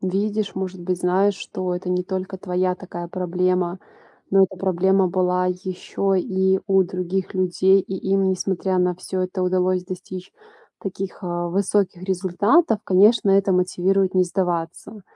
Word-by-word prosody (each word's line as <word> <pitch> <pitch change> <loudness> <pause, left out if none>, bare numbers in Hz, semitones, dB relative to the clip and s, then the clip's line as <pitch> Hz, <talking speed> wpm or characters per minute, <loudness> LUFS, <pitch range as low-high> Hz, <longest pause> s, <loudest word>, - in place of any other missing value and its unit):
видишь, 205 +3 -1
может 190 -1 -4
быть, 180 0 -2
знаешь, 190 +3 +2
что 185 -2 -4
это 180 0 -4
не 180 0 +1
только 190 +1 -5
твоя 180 0 0
такая 175 -2 -8
проблема, 180 0 -1 0.5
но 195 0 +5
эта 190 0 -8
проблема 190 +1 +2
была 180 0 +1
ещё 185 +1 -2
и 190 0 +1
у 195 -1 +4
других 185 +1 -3
людей, 185 +1 +3
и 190 - -6 0.2
им, 195 0 +3
несмотря 190 0 -1
на 180 0 +2
всё 185 +1 -5
это, 185 0 -3
удалось 185 0 +1
достичь 185 0 -8 0.5
таких, 195 0 -6
э, 175 -1 -3
высоких 195 -1 0
результатов, 200 - +2
конечно, 205 +2 +4
это 195 0 +3
мотивирует 185 +1 +1
не 185 -1 +4
сдаваться. 175 +3 -3
185 Hz, 145 wpm, -22 LUFS, 180-195 Hz, 0.5 s, но